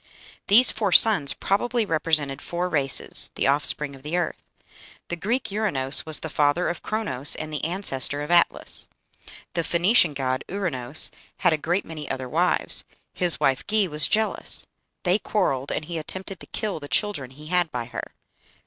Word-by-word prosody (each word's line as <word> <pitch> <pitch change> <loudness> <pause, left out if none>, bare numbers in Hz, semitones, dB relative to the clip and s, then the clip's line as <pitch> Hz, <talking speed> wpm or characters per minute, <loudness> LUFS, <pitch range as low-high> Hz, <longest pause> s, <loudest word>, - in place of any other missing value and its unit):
These 235 +5 +6
four 210 -3 -2
sons 175 -8 +5
probably 235 +3 -1
represented 155 -5 0
four 175 +1 -3
races, 140 -5 +3
the - - -1
offspring 145 0 0
of 135 - -15
the 150 +5 -3
earth. 175 - -3 0.7
The 175 - -3
Greek 215 +8 -2
Uranos 155 -11 -1
was 155 - +5
the - - -4
father 150 +4 +1
of 175 - -5
Chronos, 150 - +1
and 155 0 -7
the 150 - -4
ancestor 145 -5 0
of 150 - -6
Atlas. 175 -1 +1 0.6
The 170 - -1
Phoenician 175 -1 +2
god 130 -1 -2
Ouranos 155 -8 +3 0.3
had 175 -4 +2
a - - +3
great 170 +5 -2
many 155 -3 -8
other 130 -1 -4
wives: 170 +7 +1 0.3
his 175 -2 +1
wife 135 -1 +1
Ge 215 -1 +1
was 150 -2 +1
jealous; 220 0 0 0.4
they 180 +3 +2
quarrelled, 140 -13 -2
and 155 - -3
he 170 0 -5
attempted 190 +3 -7
to - - -11
kill 210 -6 -4
the 145 - -9
children 155 - -1
he 145 +4 -14
had 175 -2 +1
by 120 -1 -4
her. 120 0 -8
165 Hz, 170 wpm, -23 LUFS, 145-195 Hz, 0.7 s, These